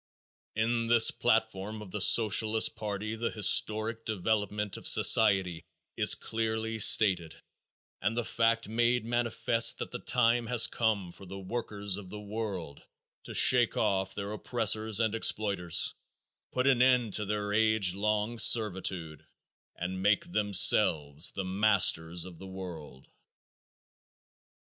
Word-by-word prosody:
In 115 +1 -2
this 115 -1 +5
platform 110 -3 -2
of 95 - -14
the 105 - -5
Socialist 110 +1 +3
party 105 +1 -6
the 115 +1 -4
historic 110 +2 +2
development 105 -1 -3
of - - -7
society 90 -3 +3 0.3
is - - +4
clearly 110 0 -5
stated 95 -6 +3 0.7
and 110 +5 -2
the 120 - -1
fact 115 0 -1
made 120 +2 -1
manifest 120 -1 +1
that - - -7
the - - -6
time 120 -1 0
has 120 -1 +3
come 105 -6 -3
for 95 - -12
the 95 - -9
workers 100 -1 -5
of 100 -3 -11
the 105 - -9
world 100 -8 -7 0.4
to - - -8
shake 120 -2 +4
off 95 0 -2
their 100 0 -6
oppressors 110 -1 -1
and 110 -2 -1
exploiters, 100 -6 -1 0.6
put 125 0 -2
an 130 -3 +2
end 125 -4 +1
to 105 - -4
their 105 0 -4
age 110 -4 +2
long 105 +3 -3
servitude, 95 -9 +1 0.5
and 95 +2 -6
make 170 - 0
themselves 80 - +2
the 95 - -5
masters 95 -4 +1
of 90 -3 -13
the 95 - -11
world. 85 -8 -11
105 Hz, 130 wpm, -28 LUFS, 95-115 Hz, 0.7 s, this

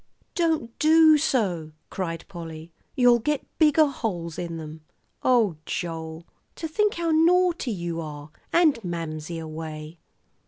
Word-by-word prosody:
"Don't 320 -9 0
do 315 0 +6
so," 185 - 0 0.2
cried 165 -3 -4
Polly. 165 -3 -9 0.2
"You'll 245 -2 +5
get 295 +5 -1
bigger 310 -1 +5
holes 180 - -4
in 170 -2 -4
'em. 155 0 -9 0.4
Oh, 225 -10 +3
Joel, 165 -1 -5 0.3
to 325 - -4
think 420 +6 +1
how 335 -1 -1
naughty 345 -1 +3
you 170 -5 -3
are, 150 -1 -8 0.2
and 310 -9 +3
Mamsie 165 -2 -4
away!" 155 0 -7
180 Hz, 125 wpm, -25 LUFS, -, 0.4 s, do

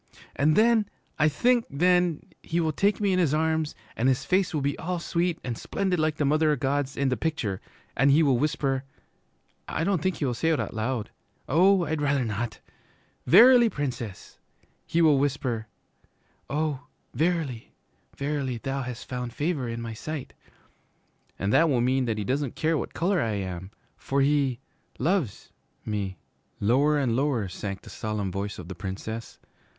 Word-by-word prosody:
'And 150 +2 +3
then 220 -1 +4 0.3
I 155 0 +5
think 240 - +2
then 175 +2 +2 0.2
he 170 - -2
will 160 -2 +1
take 200 +7 +1
me 200 -2 +2
in 185 - +2
his 155 -5 +2
arms, 160 -1 0 0.2
and 125 +4 +2
his 130 - 0
face 185 0 +2
will 155 -4 -1
be 140 0 0
all 180 +2 -2
sweet 170 0 -1
and 120 -2 -3
splendid 185 - -1
like 155 -1 +1
the 150 - 0
Mother 155 +2 +3
o' 150 - +3
God's 140 0 -1
in 140 -1 +1
the 130 - +1
picture, 125 - -2 0.3
and 135 - +4
he 150 +4 +5
will 135 -5 +3
whisper, 140 -3 0 0.8
I - - -2
don't 185 -2 +1
think 185 +2 0
he 145 - -2
will 125 - 0
say 160 +7 0
it 160 - +2
out - - -3
loud, 110 0 -2 0.4
oh, 180 +4 +4
I'd 155 -1 -2
rather 140 -3 +1
not! 110 +1 -3 0.7
"Verily, 240 +5 +8
Princess," 125 - -5 0.5
he 170 +1 +2
will 150 -4 +5
whisper, 130 -5 -1 0.8
"oh, 145 -1 -2 0.3
verily, 155 -5 -1 0.5
verily, 140 -3 -2
thou 135 +3 -3
hast 125 -2 -6
found 125 -2 -4
favor 145 -5 -1
in 115 0 -4
my 115 -1 -5
sight!" 150 +4 -6 1.0
And 100 +2 -1
that 160 +4 +5
will 130 -4 +2
mean 130 +2 +2
that 115 -2 -1
he 105 - -2
doesn't 135 +4 -1
care 160 +1 +1
what - - -4
color 180 +1 +1
I 115 -2 0
am, 95 -2 -4 0.3
for 140 +1 0
he 135 -3 +2 0.4
loves 165 - -1 0.3
me.' 100 -4 -3 0.4
Lower 140 +8 +3
and 130 -5 +1
lower 130 -6 +1
sank 100 +2 -6
the - - -11
solemn 105 -3 -3
voice 100 +1 -4
of 90 - -8
the 95 - -6
Princess. 100 +5 -6
140 Hz, 175 wpm, -26 LUFS, 120-160 Hz, 1.0 s, Verily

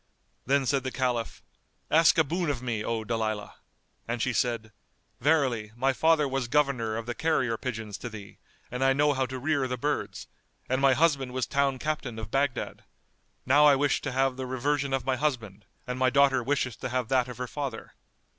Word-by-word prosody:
Then 140 0 +2
said 135 0 +1
the 130 - -2
Caliph, 125 -3 -2 0.5
"Ask 165 +1 +5
a 160 - +6
boon 170 +3 -2
of 130 -4 -2
me, 115 -4 -2
O 115 0 -2
Dalilah!"; 110 -2 -2 0.5
and 120 +1 -2
she 130 +2 0
said, 115 -1 -1 0.5
"Verily, 130 -7 +1
my 135 +3 +1
father 160 +1 +3
was 135 -2 -2
governor 125 -6 +1
of 115 - -5
the 120 - -3
carrier 130 -6 0
pigeons 110 -4 -5
to 120 - -5
thee 105 -3 -11 0.3
and 125 +2 -2
I 135 0 +4
know 145 +2 +3
how 130 -1 0
to 130 +1 -5
rear 140 0 0
the 125 0 -3
birds; 145 +4 -2 0.4
and 130 +1 0
my 135 -1 +5
husband 140 -5 +2
was 130 - 0
town 140 -1 +1
captain 145 -5 -3
of 110 -1 -7
Baghdad. 135 -1 -1 0.6
Now 145 +3 +6
I 145 - +7
wish 145 +1 +1
to 145 - -3
have 130 0 +1
the 130 -1 -4
reversion 140 +2 -1
of 135 -2 -1
my 130 -1 0
husband 115 -8 -2 0.2
and 125 0 -4
my 130 0 +4
daughter 135 0 +4
wisheth 130 -3 -1
to - - -4
have 125 -1 -1
that 130 -2 +2
of 125 - -8
her 125 - -3
father." 135 -4 -5
130 Hz, 200 wpm, -28 LUFS, 120-140 Hz, 0.6 s, I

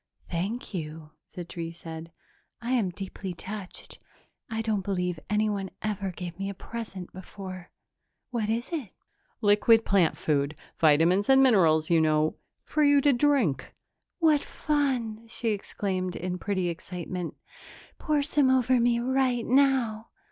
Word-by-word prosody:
"Thank 200 +8 -3
you," 155 -2 -6 0.2
the 175 - -5
tree 165 -1 -5
said. 165 -1 -9 0.5
"I 240 +1 -4
am 230 -7 +2
deeply 190 0 -6
touched. 200 +1 -8 0.5
I 225 0 -2
don't 215 -3 0
believe 180 -3 -1
anyone 210 -2 0
ever 205 -2 -2
gave 175 -1 -7
me 195 0 -2
a 200 - -6
present 205 -5 -7
before. 185 -1 -9 0.6
What 225 -4 -1
is 230 +6 -1
it?" 285 - -3 0.5
"Liquid 220 +2 +5
plant 185 -5 +3
food 145 0 0 0.2
vitamins 165 - +4
and 270 0 +7
minerals, 165 -10 +4
you 165 -1 +5
know. 155 0 +2 0.3
For 305 - 0
you 285 -1 +6
to 285 0 +4
drink." 240 - +1 0.4
"What 315 -4 +3
fun!" 250 -7 -1
she 225 +1 -1
exclaimed 190 -3 -2
in 180 +1 -3
pretty 190 -2 -1
excitement. 180 0 -5 0.6
"Pour 300 -2 +1
some 285 -2 +2
over 255 -1 +3
me 235 0 +3
right 255 -1 +1
now!" 250 -4 +2
200 Hz, 140 wpm, -27 LUFS, 175-240 Hz, 0.6 s, and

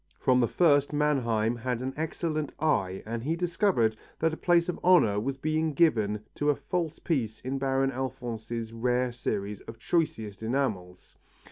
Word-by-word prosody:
From 125 -1 +3
the 120 - +3
first, 145 -3 +3
Mannheim 120 -7 +1
had 125 0 -2
an 130 +1 -3
excellent 155 -1 -2
eye 95 -12 0
and 115 +1 -4
he 160 +5 0
discovered 170 - +1 0.2
that 160 0 +1
a - - -4
place 175 -1 +3
of 180 - -3
honour 170 - +5
was 135 +5 -3
being 155 +2 0
given 105 -10 +2
to 145 - 0
a 145 - +4
false 170 -1 -3
piece 120 - -2
in 135 +1 -3
Baron 135 0 +1
Alphonse's 120 -3 -4
rare 125 +2 0
series 105 -4 -3
of 115 - -10
choicest 110 - -1
enamels. 110 -7 -3
130 Hz, 160 wpm, -28 LUFS, 115-155 Hz, 0.2 s, honour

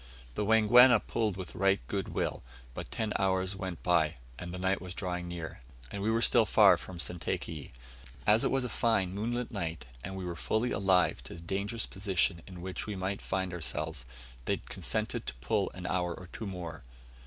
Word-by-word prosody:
The 105 - -1
Wangwana 110 +3 +7
pulled 110 -4 -1
with 95 -3 -6
right 95 +1 +3
good - - -2
will, - - -2 0.3
but - - -6
ten 110 -2 -2
hours 95 0 +1
went 95 -3 -5
by, 85 -3 +3 0.2
and 85 0 -5
night 95 +2 0
was 90 -1 -7
drawing 90 -2 -3
near, 85 -6 -6 0.3
and 100 - -4
we 105 - +1
were 115 +1 +2
still 115 -3 +5
far - - +7
from 95 - -8
Sentakeyi. 85 -3 -3 0.5
As 105 +2 +5
it - - +3
was 135 -1 +1
a - - -1
fine 105 -7 +1
moonlight 120 +4 -2
night, 80 - -3 0.2
and 95 - -5
we 95 - -4
were 85 -1 -3
fully 110 +7 0
alive 95 -8 +3
to - - -7
the 85 - -10
dangerous 100 +6 -2
position 95 -3 +1
in 90 -2 -9
which 95 +2 -4
we 105 - -3
might 95 +1 -2
find 95 -1 -2
ourselves, 75 -5 -2 0.4
they - - +1
consented - - -2
to 70 - -3
pull 95 - 0
an 90 -1 -7
hour 90 -1 0
or 90 - -11
two 110 - -5
more. 90 -5 -6
95 Hz, 190 wpm, -31 LUFS, 85-105 Hz, 0.5 s, Wangwana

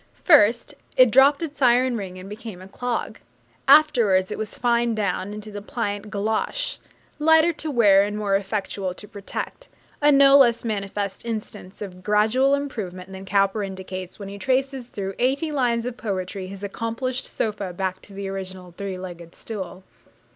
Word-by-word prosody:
First 235 - +5 0.2
it 255 -3 +7
dropped 275 +6 +5
its 295 -3 -6
iron 250 0 +4
ring 190 -4 -5
and 185 +1 -9
became 210 -2 -8
a 185 - -11
clog; 240 +1 -3 0.5
afterwards 240 -11 +5
it - - -3
was 215 -1 -5
fined 235 -1 +2
down 200 -2 -1
into 210 0 -8
the 205 0 -6
pliant 205 -1 -4
galoshe 220 - -2 0.4
lighter 320 +2 +5
to 310 0 -4
wear 210 -8 +5
and 205 +1 -1
more 205 -2 +1
effectual 195 -2 -2
to 210 - -10
protect 205 - -7 0.3
a 295 0 +6
no 275 -1 +7
less 235 -3 +4
manifest 200 -2 -3
instance 210 -3 -6
of 185 -2 -9
gradual 215 +8 +3
improvement 195 -10 -5
than 190 0 -8
Cowper 195 +1 +2
indicates 185 -1 -6
when 200 - -8
he 200 +1 -8
traces 265 +1 0
through 195 -4 -5
eighty 275 +5 +1
lines 240 -5 +1
of 250 -1 -4
poetry 190 -3 -4
his 195 +1 -9
'accomplished 230 +5 -3
sofa' 205 -4 -3
back 185 +1 -3
to 200 - -12
the 200 0 -4
original 185 -2 -7
three 195 -1 -5
legged 175 -2 -9
stool. 190 -4 -7
210 Hz, 165 wpm, -23 LUFS, 195-250 Hz, 0.5 s, it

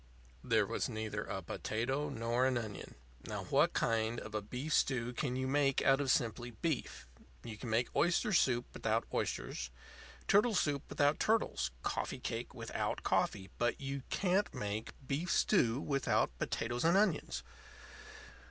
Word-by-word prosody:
There - - +3
was - - -2
neither 110 -1 -3
a - - -4
potato 135 +7 -2
nor 120 0 +1
an 130 -2 +1
onion. 110 -4 -6 0.3
Now, - - -4
what - - +3
kind 115 0 +1
of 110 - -9
a 105 - -1
beef 125 +9 -4
stew 125 -2 +2
can 125 0 -2
you 130 0 -1
make 135 0 +2
out 135 +1 +4
of 140 - -1
simply 120 0 +1
beef? 135 - -3 0.4
You 110 - -6
can 115 +3 -7
make 115 +2 0
oyster 180 +6 +2
soup 125 -7 +3
without - - 0
oysters, 60 0 -2 0.6
turtle 210 +2 +4
soup 145 -5 +1
without 145 0 +2
turtles, 215 - +1
coffee - - -2
cake - - -4
without - - -3
coffee, 95 -1 0
but 120 0 +1
you 140 0 -4
can't 195 +2 +1
make 105 +1 -4
beef 155 +6 -1
stew 125 - +3
without 140 - +1
potatoes 120 +1 -1
and 170 +3 +5
onions. 210 +1 +1
130 Hz, 150 wpm, -34 LUFS, 115-145 Hz, 0.6 s, and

